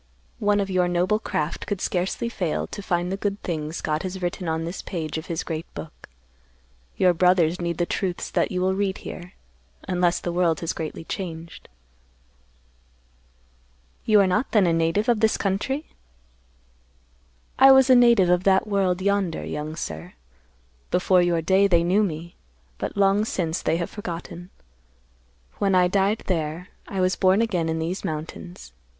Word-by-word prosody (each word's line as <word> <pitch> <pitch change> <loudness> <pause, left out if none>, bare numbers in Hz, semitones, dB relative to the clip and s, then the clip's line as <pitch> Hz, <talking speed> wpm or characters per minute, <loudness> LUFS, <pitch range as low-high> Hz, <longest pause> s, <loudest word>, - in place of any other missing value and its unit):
One 205 0 +2
of 195 -1 -2
your 180 -1 +2
noble 180 +4 +1
craft 150 -7 -3
could 205 - -2
scarcely 185 +5 -1
fail 180 -8 -2
to 205 - -8
find 175 -1 -1
the 195 - -2
good 200 0 -2
things 155 -2 -4
God 155 0 -1
has 190 0 -5
written 175 -1 -3
on 160 0 -1
this 170 +3 -5
page 160 -5 -5
of 160 - -11
His 165 -2 -3
great 160 -1 -5
book. 155 - -10 0.9
Your 180 -1 +4
brothers 180 0 +3
need 170 -1 -2
the 175 - +1
truths 180 0 -3
that - - 0
you 180 -1 -1
will 190 +1 +2
read 195 0 -1
here; 180 0 -8 0.5
unless 175 -1 +1
the 175 - -3
world 170 -2 +1
has 165 - -2
greatly 160 0 -6
changed." 165 -2 -7 2.3
"You 215 -2 +4
are - - +4
not 185 +7 0
then 210 -4 +5
a 170 - +2
native 165 +7 +1
of 235 -3 +3
this 220 0 +2
country?" 235 +10 -2 1.7
"I 270 - +9
was 265 -1 +6
a 260 - +6
native 235 -6 +5
of 180 0 +2
that 190 +1 +3
world 190 -3 0
yonder, 200 -4 0
young 150 +1 -5
sir. 80 - -6 0.8
Before 180 0 +3
your 170 -2 +1
day, 190 +4 +4
they 170 -3 +3
knew 185 +5 +3
me; 170 -3 -3 0.5
but - - -4
long 200 +1 +3
since, 175 -6 -2
they 165 - +1
have 170 - -4
forgotten. 175 -2 -7 1.1
When 195 -2 +2
I 180 -1 +5
died 200 +3 +1
there, 165 0 -2 0.2
I 195 - -4
was 185 +1 +2
born 190 +1 +3
again 180 -8 0
in 160 - -1
these 165 +4 -3
mountains. 85 - -7
180 Hz, 170 wpm, -24 LUFS, 165-195 Hz, 2.3 s, I